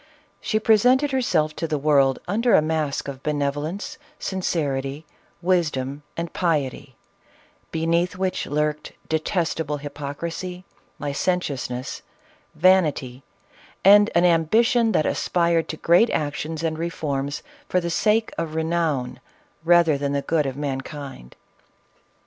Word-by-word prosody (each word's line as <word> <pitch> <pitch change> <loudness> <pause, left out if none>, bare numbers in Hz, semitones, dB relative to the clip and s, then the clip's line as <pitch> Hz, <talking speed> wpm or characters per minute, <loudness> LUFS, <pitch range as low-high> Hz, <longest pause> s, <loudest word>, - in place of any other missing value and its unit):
She 215 - 0
presented 250 +6 +4
herself 165 -13 +1
to 165 - -2
the 155 -1 -1
world, 140 -2 +3
under 230 +6 +3
a - - +6
mask 155 -3 -1
of 135 -1 -6
benev 145 -1 0
olence, 155 +8 -5 0.2
sincerity, 145 -6 -2 0.4
wisdom, 150 -6 0 0.2
and 170 0 -4
piety, 145 -6 -1 0.7
beneath 170 +2 0
which 185 0 -1
lurked 150 +1 -2 0.2
detestable 160 -1 -1
hypocrisy, 165 +6 -6 0.3
licentiousness, 140 -4 -2 0.5
vanity, 150 -7 +2 0.6
and 205 +2 +8
an 170 +1 +5
ambition 220 +8 +3
that 155 - +2
aspired 170 -2 +1
to 155 - -4
great 175 +10 +4
actions 155 +2 -2
and 160 -1 -1
re 170 +1 -1
forms, 145 -3 -3 0.3
for 180 - +2
the 170 -1 -3
sake 215 +6 +2
of 160 -2 -3
renown, 160 -6 -1 0.4
rather 170 -3 +4
than 140 0 -1
the 140 0 -1
good 155 -3 +1
of 135 0 -5
mankind. 135 - -6
160 Hz, 120 wpm, -23 LUFS, 145-180 Hz, 0.7 s, and